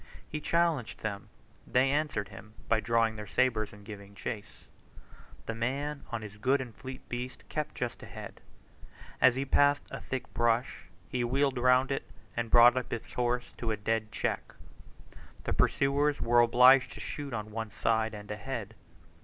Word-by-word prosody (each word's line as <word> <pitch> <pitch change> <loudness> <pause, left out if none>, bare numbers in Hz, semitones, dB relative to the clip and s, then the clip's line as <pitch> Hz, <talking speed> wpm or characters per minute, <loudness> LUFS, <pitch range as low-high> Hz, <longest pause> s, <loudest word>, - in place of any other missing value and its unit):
He 150 - -5
challenged 165 -7 +1
them; 100 -2 -4 0.4
they 130 +2 +3
answered 145 -9 -1
him 105 +2 -12
by 115 - +3
drawing 115 0 +1
their 105 0 -7
sabres 110 0 +1
and 105 -1 -14
giving 100 -1 -10
chase. 105 0 -6 0.8
The 115 - -3
man, 140 +6 -2
on 115 -2 -3
his 100 -1 -9
good 130 +6 +2
and 125 -3 -6
fleet 130 +2 -9
beast, 125 +1 -5
kept 150 -1 -3
just 125 -2 -4
ahead: - - -9 0.8
as 125 - +6
he 135 +1 -1
passed 145 +1 +4
a - - -6
thick 130 0 -5
bush 115 -6 +1 0.2
he 125 -1 -1
wheeled 135 +1 +1
round 125 +2 +4
it, 135 - -3 0.3
and 120 -1 -2
brought 120 +1 +8
up 130 -1 -2
his 115 - -5
horse 125 0 -1
to 115 - -2
a 110 - 0
dead 110 +1 -1
check. - - -3 0.9
The - - -1
pursuers 145 +1 +2
were 120 +1 +4
obliged 125 +2 +6
to - - -10
shoot 145 -2 -5
on 110 -2 -4
one 110 0 -4
side 110 +2 0
and 105 0 -8
ahead. 110 -1 -5
120 Hz, 170 wpm, -30 LUFS, 110-130 Hz, 0.9 s, brought